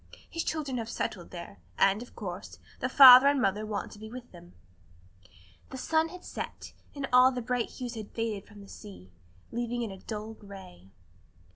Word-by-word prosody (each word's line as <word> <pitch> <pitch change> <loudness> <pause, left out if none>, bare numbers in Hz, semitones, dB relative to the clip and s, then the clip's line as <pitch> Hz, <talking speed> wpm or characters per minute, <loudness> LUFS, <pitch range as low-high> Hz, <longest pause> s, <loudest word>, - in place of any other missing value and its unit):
His 330 0 -4
children 285 -5 -3
have 225 0 -5
settled 180 -6 -4
there, 170 - -9 0.2
and, 195 +2 +3
of 245 - -12
course, 185 -3 -7 0.2
the 255 - -1
father 260 0 +10
and 285 -1 +3
mother 210 -1 0
want 210 -2 -4
to 210 - -12
be 220 0 -9
with 245 +1 -10
them." 175 0 -15 1.2
The 265 - -7
sun 320 +4 +1
had 365 +1 -11
set, - - -7 0.2
and 280 -1 -3
all 255 +1 +7
the 250 - -4
bright 245 0 -2
hues 250 -2 -6
had 220 -3 -7
faded 225 -3 -4
from 205 -1 -14
the 200 - -13
sea, 195 - -12 0.4
leaving 240 0 -2
it 220 - -4
a 190 - -11
dull 215 0 -6
gray. 190 - -13
225 Hz, 185 wpm, -29 LUFS, 200-255 Hz, 1.2 s, father